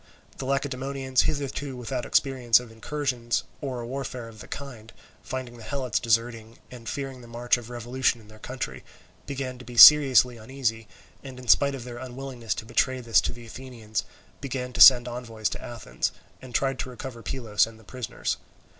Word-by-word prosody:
The 135 - -4
Lacedaemonians, 135 -1 0
hitherto 140 -2 -3
without 125 +1 -4
experience 130 -4 +3
of 125 -2 -11
incursions 120 0 -2 0.2
or 130 -4 -4
a - - -6
warfare 130 -2 -5
of 110 -1 -13
the - - -10
kind, 120 -6 -8 0.3
finding 130 -2 -6
the 115 - -11
Helots 130 -2 -1
deserting, 115 0 0
and 120 -2 -8
fearing 135 -2 -5
the 120 - -13
march 120 +1 +1
of 120 -1 -8
revolution 120 +1 0
in 110 - -17
their 110 0 -15
country, 105 - -6 0.4
began 135 -3 -4
to - - -10
be 120 -1 -10
seriously 130 -4 +9
uneasy, 115 -1 -3 0.4
and 135 -2 -9
in 125 -1 -11
spite 140 +4 +5
of 130 - -7
their 120 -1 -8
unwillingness 130 -2 -5
to - - -6
betray 130 +3 +1
this 115 -2 +3
to - - -2
the 120 0 -11
Athenians 115 -3 -5 0.4
began 125 -2 -4
to - - 0
send 125 -2 +10
envoys 115 -3 -3
to - - -6
Athens, 120 -3 -3 0.3
and 125 -2 -10
tried 135 -1 +1
to - - -3
recover 125 -1 -8
Pylos 115 -5 +1
and 115 -1 -13
the - - -17
prisoners. 125 +2 -4
125 Hz, 180 wpm, -26 LUFS, 115-130 Hz, 0.4 s, send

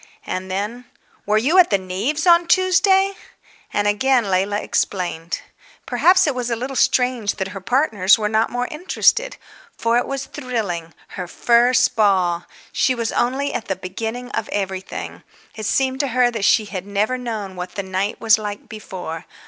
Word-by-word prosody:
And 185 +1 -4
then, 210 +6 -4 0.4
"Were 210 +1 +3
you 295 +12 +3
at 360 - +6
the 200 - +3
Neaves' 200 - -2
on 340 -1 +5
Tuesday?" 380 +2 +3 0.6
And 205 0 0
again 230 0 +2
Leila 195 +3 +1
explained. 175 -5 -2 0.4
Perhaps 365 +1 +4
it 295 - +1
was 250 -1 -3
a 235 - 0
little 255 +4 -5
strange 250 -4 +1
that 190 0 -3
her 195 +1 -8
partners 210 -3 +3
were 215 -1 -1
not 220 +1 +1
more 245 0 -2
interested. 430 +9 +1 0.4
For 230 +1 +2
it - - -3
was 275 0 -4
thrilling. 210 - -4
Her 180 -2 -6
first 240 +6 +3
ball! 185 -5 +2 0.3
She 255 - +1
was 230 -2 -2
only 265 +4 0
at 235 - -4
the 190 - -1
beginning 225 +7 -5
of - - -3
everything. 190 -2 -4 0.3
It 215 -2 -5
seemed 265 -1 +1
to 280 - +1
her 250 -1 +2
that 225 -4 -2
she 215 +3 +4
had 195 -1 -6
never 205 +5 0
known 215 -6 -5
what 180 0 -7
the 200 - -3
night 190 +2 -2
was 220 -2 +4
like 205 -1 -6
before. 185 -7 -7
220 Hz, 175 wpm, -20 LUFS, 195-255 Hz, 0.6 s, at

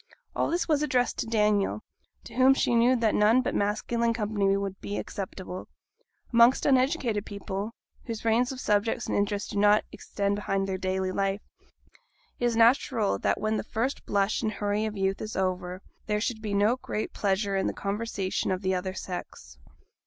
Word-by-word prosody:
All - - +1
this 345 +2 0
was 300 -3 +2
addressed 255 -5 +1
to - - -2
Daniel, 210 -1 +1 0.4
to - - -12
whom 260 +1 +5
she 245 - +1
knew 240 +2 +4
that 230 -3 +1
none 220 +5 +4
but - - -2
masculine 230 +3 0
company 205 -3 +1
would 195 0 -4
be 205 - -4
acceptable. 185 -1 -6 0.7
Amongst 235 +2 +5
uneducated 255 - +2
people 200 +1 -5 0.3
whose 230 -1 -6
range 235 +3 +2
of 260 - -7
subjects 210 0 0
and - - -2
interest 205 0 -1
do 200 - -1
not 205 +1 +5
extend 200 0 -2
beyond 195 -1 -1
their 190 -1 -3
daily 185 0 -1
life 195 +1 -1 1.0
it 245 - 0
is 240 -1 +1
natural 230 -2 +3
that - - 0
when 215 0 0
the - - -2
first 245 +5 -2
blush 200 +1 +1
and 215 - -1
hurry 205 +1 -1
of 215 -1 -6
youth 195 0 0
is 215 0 -5
over, 185 0 -2 0.2
there 210 -1 +1
should 220 0 -2
be 210 -2 -2
no 210 +5 +3
great 215 -4 -4
pleasure 200 0 0
in 195 - +1
the - - 0
conversation 200 -1 -2
of 185 +1 -1
the 190 0 +1
other 185 +1 -3
sex. 65 - -7
210 Hz, 180 wpm, -27 LUFS, 195-230 Hz, 1.0 s, whom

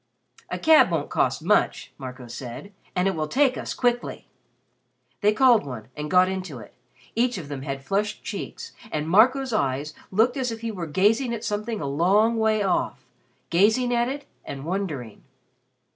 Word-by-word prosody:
"A - - -3
cab 315 -1 +6
won't - - -2
cost - - +1
much," - - +1
Marco 130 -1 -8
said, 125 - -8 0.2
"and 180 +1 +2
it 195 - +1
will 155 -2 -2
take 265 - +3
us - - -5
quickly." 245 -1 -1 0.9
They 210 0 +4
called 240 - +5
one 120 -5 -8
and 150 0 -5
got 180 +2 +5
into 185 -7 -4
it. 105 -3 -12 0.4
Each 245 0 +1
of 155 -6 -7
them 140 -2 -5
had 135 -1 -5
flushed 205 +2 -1
cheeks, - - -6 0.2
and 150 0 -2
Marco's 250 +8 +4
eyes 145 -5 -1 0.2
looked 225 +7 +2
as 255 -3 -1
if 225 0 -6
he 230 -1 -3
were 180 -5 -5
gazing 220 - +2
at 225 - -8
something 215 +1 -2
a - - -3
long 195 +11 +3
way 220 -1 +2
off 190 - -1 0.5
gazing 220 +8 +3
at 240 +1 +2
it, 285 +1 -5 0.2
and 135 0 -7
wondering. 160 - -4
200 Hz, 175 wpm, -25 LUFS, 150-235 Hz, 0.9 s, cab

